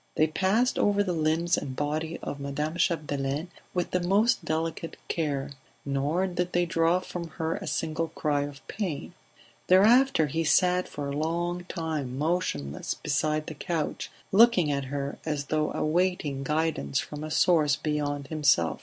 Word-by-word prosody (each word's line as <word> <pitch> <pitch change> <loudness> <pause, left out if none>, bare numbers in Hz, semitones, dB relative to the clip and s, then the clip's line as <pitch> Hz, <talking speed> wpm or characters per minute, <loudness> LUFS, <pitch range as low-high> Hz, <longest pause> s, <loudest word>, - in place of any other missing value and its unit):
They 155 - +4
passed 195 +10 +1
over 205 0 +3
the 185 -3 -1
limbs 165 +2 +1
and 130 -2 -6
body 155 +3 -2
of 145 - -4
Madame 140 +3 -3
Chapdelaine 150 -2 -1 0.3
with 180 -1 -1
the 180 - +1
most 195 +4 +2
delicate 165 0 -3
care, 145 -4 -2 0.3
nor 145 +6 0
did 180 -1 -2
they 175 0 +3
draw 165 +1 +2
from 175 -2 -6
her 160 0 -1
a - - -7
single 165 0 -1
cry 150 -2 -1
of 145 0 -7
pain; 185 -9 -4 0.5
thereafter 215 +1 +5
he 160 +3 -1
sat 180 +3 +3
for 145 -1 -5
a 140 - -3
long 175 +3 -1
time 155 -8 -3
motionless 145 - -1
beside 150 +1 0
the - - -6
couch, 155 +1 -3 0.2
looking 195 -7 +5
at 140 -1 -1
her 140 +1 -4
as 150 -2 -2
though 155 +1 0
awaiting 155 -4 0
guidance 150 - 0
from 150 0 -3
a 155 - -4
source 155 -3 +3
beyond 145 -2 -2
himself. 140 - +2
155 Hz, 155 wpm, -27 LUFS, 145-175 Hz, 0.5 s, thereafter